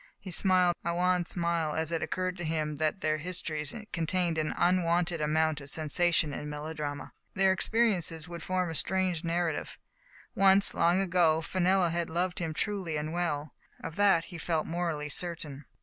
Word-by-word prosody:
He 185 - -9
smiled 180 0 +3
a 170 0 -1
wan 180 0 +2
smile, 170 -3 -1
as 160 0 -2
it 165 - -1
occurred 185 +3 -2
to 175 - -5
him 155 -2 -2
that 155 +5 -1
their 155 0 0
histories 155 -3 -1 0.2
contained 170 0 0
an 155 - -1
unwonted 175 -1 +2
amount 155 0 +1
of 140 - -9
sensation 160 0 +1
and 150 - -5
melodrama. 150 -1 -5 0.2
Their 190 0 +4
experiences 190 -6 +1
would 170 -1 -7
form 185 -2 -1
a - - -4
strange 185 0 0
narrative. 170 -2 -2 0.6
Once, 195 0 +5
long 170 +2 +3
ago, 170 -4 +2
Fenella 185 +1 +2
had 170 0 -2
loved 175 +2 -1
him 165 -3 -2
truly 190 -7 -2
and 155 +2 -3
well. 155 -4 -2 0.3
Of 160 - -6
that 195 -5 +4
he 175 -3 -9
felt 160 -1 -1
morally 165 -3 -2
certain. 150 -3 -3
170 Hz, 165 wpm, -30 LUFS, 155-180 Hz, 0.6 s, Once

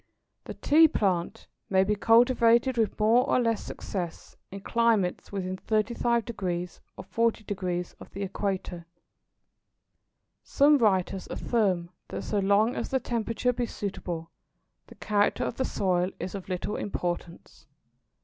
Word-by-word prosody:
The - - -7
Tea 320 +2 +5
plant 190 - -1 0.2
may 190 -1 +4
be 210 +2 +1
cultivated 235 +3 +4
with 225 -2 0
more 225 +4 +4
or - - +3
less 230 -3 0
success 175 -4 -6
in 195 0 -8
climates 225 -4 +1
within 185 -2 -3
35° 215 -5 -1 0.2
or - - -7
40° 195 -4 -2
of - - -12
the 200 - -6
Equator. 190 -3 -4 1.5
Some 290 +1 +4
writers 190 -4 +1
affirm 185 -7 0 0.2
that - - -5
so 210 - -1
long 205 +5 +3
as - - -3
the 265 - +1
temperature 235 +1 -1
be 245 0 -2
suitable, 175 -6 -5 0.6
the - - -14
character 205 -1 +1
of - - -3
the 260 - 0
soil 180 -4 0
is 185 - -5
of 195 -2 -7
little 185 +3 -3
importance. 175 -5 -5
205 Hz, 130 wpm, -27 LUFS, 185-230 Hz, 1.5 s, Tea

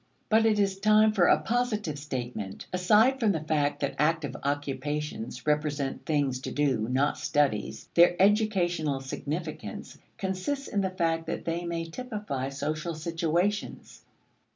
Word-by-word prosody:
But 225 +1 +5
it 215 -1 +3
is 195 -1 +1
time 215 +1 +5
for 185 -5 +4
a - - +5
positive 215 - -1
statement. 120 -9 -5
Aside 215 +9 +4
from 220 -5 +3
the 160 - -1
fact 150 -1 0
that 140 - -1
active 155 -1 +1
occupations 145 -3 -3
represent 150 -2 -1
things 140 -4 +1
to - - -6
do, 130 -6 0
not 135 +3 +1
studies, 140 -8 0
their 175 +1 +5
educational 185 -8 +2
significance 155 +7 -5 0.2
consists 195 +10 -2
in 200 - 0
the 190 - 0
fact 165 -3 -1
that 165 - -4
they 170 +1 -2
may 170 -1 -2
typify 205 - -4
social 155 +4 -3
situations. 170 +5 -2
165 Hz, 140 wpm, -28 LUFS, 145-195 Hz, 0.2 s, But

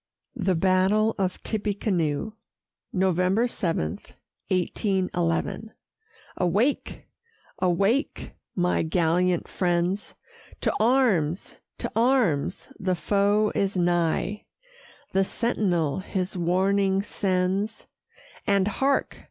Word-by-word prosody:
THE 190 -6 +1
BATTLE 190 +5 +3
OF 185 -2 -2
TIPPECANOE 200 -4 -1 0.6
[November 185 +4 +2
7, 165 - -2 0.5
1811] 185 +2 -1 0.7
Awake! 205 - 0 0.5
awake! 195 - 0 0.2
my 180 -1 +1
gallant 175 +2 +1
friends; 180 +2 -1 0.5
To - - +1
arms! 215 - +2 0.2
to - - -4
arms! 225 - +1
the 185 -2 0
foe 205 +3 +2
is 195 -1 0
nigh; 175 +3 0 0.7
The 195 +1 +3
sentinel 190 - 0
his 185 -1 -3
warning 190 +2 +2
sends; 195 +1 -1 0.6
And 200 -1 +3
hark! 270 +6 0
190 Hz, 85 wpm, -25 LUFS, 175-210 Hz, 0.7 s, BATTLE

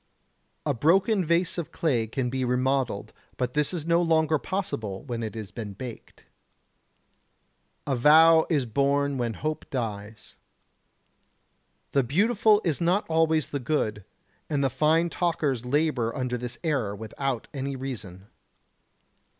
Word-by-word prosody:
A 145 - +1
broken 190 - +3
vase 170 +2 +1
of 170 - -5
clay 125 -9 0
can 125 +2 -2
be 130 0 -1
remodelled, 125 -3 0 0.2
but 125 -1 -2
this 150 -1 +1
is 170 -4 -4
no 170 +1 +3
longer 160 -2 +2
possible 110 - -4
when 120 -4 -4
it 110 0 -5
has 110 -3 -7
been 105 -4 -6
baked. 120 +3 -10 1.6
The 135 - 0
vow 160 +5 +6
is 145 -6 +1
born 140 +3 +1
when 115 -2 -1
hope 155 +1 -4
dies. 110 -4 -5 1.5
The 140 - +3
beautiful 210 - +3
is 165 -1 0
not 180 +5 +2
always 160 -1 +2
the 140 - -3
good. 110 -7 -1 0.5
And 145 -2 0
the 135 - +1
fine 160 +5 +2
talkers 150 -8 -1
labour 130 -4 0
under 125 -2 -1
this 120 -1 -5
error 135 -11 0
without 115 +4 -4
any 140 0 -3
reason. 110 -8 -7
140 Hz, 135 wpm, -26 LUFS, 120-160 Hz, 1.6 s, vow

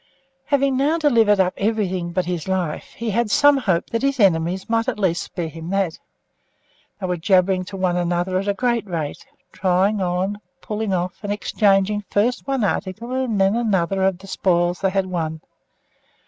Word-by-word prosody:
Having 275 -2 +1
now 295 +5 +2
delivered 230 -10 +3
up 185 -1 +2
everything 195 -5 -1
but 180 +1 -1
his 175 -2 -3
life, 185 -5 -2
he 230 -1 -3
had 230 +2 0
some 290 +6 +5
hope 190 -10 0
that 230 - -1
his 275 -1 0
enemies 180 -1 +2
might 230 +1 0
at 260 - -1
least 185 -4 +1
spare 175 -3 -5
him 165 +1 -8
that. 195 -4 -1 1.0
They 195 - -3
were 180 -1 -1
jabbering 185 +1 +2
to 195 +1 -8
one 185 -2 0
another 175 +1 0
at 195 - -4
a 200 - +1
great 235 -2 0
rate, 160 -5 -4 0.2
trying 190 +2 +1
on, 185 +3 -1 0.2
putting 215 -1 -3
off, 180 -1 -2
and 205 - -2
exchanging 205 0 +1
first 235 +6 0
one 270 -4 0
article 210 +4 -2
and 255 -5 -1
then 195 +2 +3
another 195 -5 0
of 190 -1 +2
the 190 - -14
spoils 175 -2 +1
they 195 - +2
had 195 0 0
won. 160 -3 -3
195 Hz, 180 wpm, -21 LUFS, 180-220 Hz, 1.0 s, some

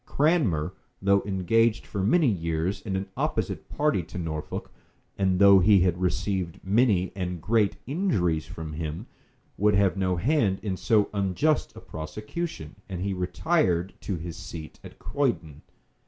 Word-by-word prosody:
Cranmer, 120 - +1 0.3
though 100 0 +3
engaged 105 +4 +2
for 100 - -4
many 150 - +3
years 85 -2 -1
in 100 -4 -3
an 95 +1 -1
opposite - - -2
party 150 -10 +1
to 85 +2 -9
Norfolk, 80 -3 -4 0.4
and 95 -2 +1
though 100 0 +8
he 100 +1 +5
had 90 0 +1
received 90 -1 -1
many 100 -2 +2
and 90 -2 -3
great 105 +3 +2
injuries 110 - 0
from 80 -1 -7
him, 80 +5 -4 0.5
would 105 0 +4
have 100 -1 +3
no 95 -1 +1
hand 105 - +2
in 100 -3 -1
so 105 +1 +2
unjust 100 - 0
a - - -9
prosecution; 105 - -6
and 90 -2 -4
he 100 +1 -1
retired 90 - 0
to 100 - -3
his 85 0 -6
seat 85 -4 -9
at - - -12
Croydon. 85 - -2
95 Hz, 150 wpm, -26 LUFS, 85-110 Hz, 0.5 s, though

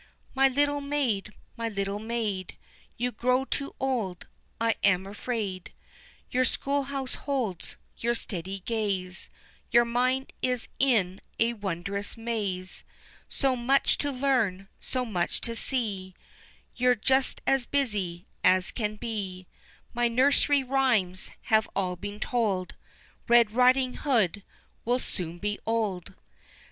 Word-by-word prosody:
My 270 0 +5
little 285 +2 +1
maid, 270 -8 0 0.2
my 230 -1 -2
little 200 -1 -2
maid, 215 -5 -3 0.4
You 245 +1 0
grow 250 +3 +1
too 280 +1 -4
old, 230 -10 -1 0.3
I 230 0 +3
am 190 -2 +4
afraid, 200 -2 -4 0.6
The 255 +1 +3
schoolhouse 275 0 -1
holds 245 - -3 0.2
your 235 +1 +1
steady 190 -2 -4
gaze, 195 -4 -2 0.4
Your 235 +1 +6
mind 255 +3 0
is 250 -2 0
in 205 -9 +2 0.2
a 230 +1 +3
wondrous 200 0 -3
maze, 205 -5 -3 0.5
So 270 -2 +1
much 260 +3 +2
to 285 - 0
learn, 245 -8 +1
so 255 -1 -2
much 180 -7 -1
to 230 - -3
see, 205 -8 -2 0.6
You're 250 0 +4
just 260 +4 +2
as 270 -3 +2
busy 205 -11 -1 0.2
as 185 0 +4
can 215 -3 -2
be, 200 -5 -4 0.5
My 240 0 +2
nursery 275 +3 +3
rhymes 245 -9 +1 0.2
have 220 0 +5
all 185 -2 0
been 205 +3 -6
told, 210 -7 0 0.5
Red 235 -3 +6
Riding 255 +2 +4
Hood 215 - +2 0.4
will 245 +2 +2
soon 175 -8 -4
be 205 +3 -2
old. 215 -6 -1
230 Hz, 125 wpm, -28 LUFS, 195-255 Hz, 0.6 s, Your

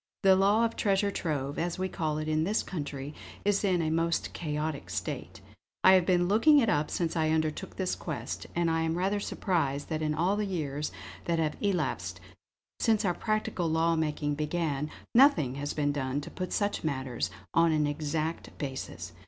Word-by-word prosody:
The 190 -1 +7
law 200 +4 +4
of 230 - -2
Treasure 200 -1 +2
Trove, 145 -6 -2
as 170 0 -1
we 185 0 -1
call 155 -4 -2
it 155 0 -3
in 155 0 +1
this 205 +6 +1
country, 145 -4 -5 0.3
is 205 0 +2
in 180 -4 +2
a 155 - 0
most 165 +1 0
chaotic 150 -2 -3
state. - - -4 0.4
I 190 - +9
have 185 -2 +4
been 175 -1 +3
looking 230 - +6
it 235 -6 +4
up 150 +1 +1
since 170 -1 -1
I 160 -1 +2
undertook 155 -1 -1
this 185 -1 -1
quest; 140 -7 -5
and 170 -1 +2
I 165 0 +1
am 160 +1 0
rather 195 +3 +1
surprised 150 -9 -1
that 155 -1 -2
in 155 -1 0
all 175 +6 +2
the 210 - 0
years 150 -5 -2 0.3
that 170 -1 +1
have 155 -2 0
elapsed 135 - -1 0.6
since 220 -2 +2
our 180 - +2
practical 215 -3 -1
law 165 +1 +2
making 150 -2 0
began, 150 -1 -1 0.2
nothing 230 - +5
has 145 - -2
been 145 -1 0
done 135 -1 -1
to - - -9
put 185 -1 -4
such 205 0 0
matters 130 -5 -2 0.2
on 165 0 +4
an 155 -1 +2
exact 155 +2 -3
basis. 130 - -5
160 Hz, 185 wpm, -29 LUFS, 150-185 Hz, 0.6 s, I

